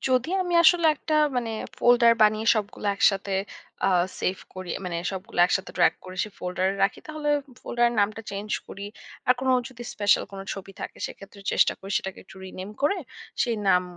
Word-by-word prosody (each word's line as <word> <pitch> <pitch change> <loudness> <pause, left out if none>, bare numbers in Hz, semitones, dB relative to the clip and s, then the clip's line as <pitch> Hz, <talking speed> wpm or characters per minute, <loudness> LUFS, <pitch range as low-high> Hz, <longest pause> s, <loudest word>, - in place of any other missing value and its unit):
যদি 255 +3 +2
আমি 355 -1 -2
আসলে 340 0 +6
একটা 310 +1 -3 0.2
মানে 235 -2 -1 0.3
folder 240 -1 +6
বানিয়ে 215 +1 +3
সবগুলো 210 0 -3
একসাথে 195 -1 +2 0.5
আ - - +4 0.3
সেইভ 185 - 0 0.2
করি। 185 -1 -7 0.2
মানে 175 -2 -3 0.2
সবগুলো 185 -1 -7
একসাথে 190 0 -1
drag - - +5
করে 185 0 -9
সেই 210 - -11
folder 180 +1 -1
এ - - -5
রাখি, 195 - +2
তাহলে 310 -1 -4 0.2
ঐ - - -16
folder 240 0 0
এর - - -4
নামটা 210 +2 0
চেইঞ্জ 200 +2 -5 0.2
করি। 200 +1 -7 0.4
আর 250 - +7
কোন 260 - -1 0.2
যদি 245 -2 -10
স্পেশাল 205 -1 +3
কোন 195 - -6
ছবি 195 0 -9
থাকে, - - -6
সেক্ষেত্রে 200 0 -12
চেষ্টা - - +4
করি 195 +1 -9
সেটাকে 190 0 -7
একটু 190 - -15
রিনেম 185 +2 -7
করে, 345 +8 +3 0.5
সেই 235 -2 0
নাম 180 -1 +5
205 Hz, 190 wpm, -26 LUFS, 190-245 Hz, 0.5 s, আর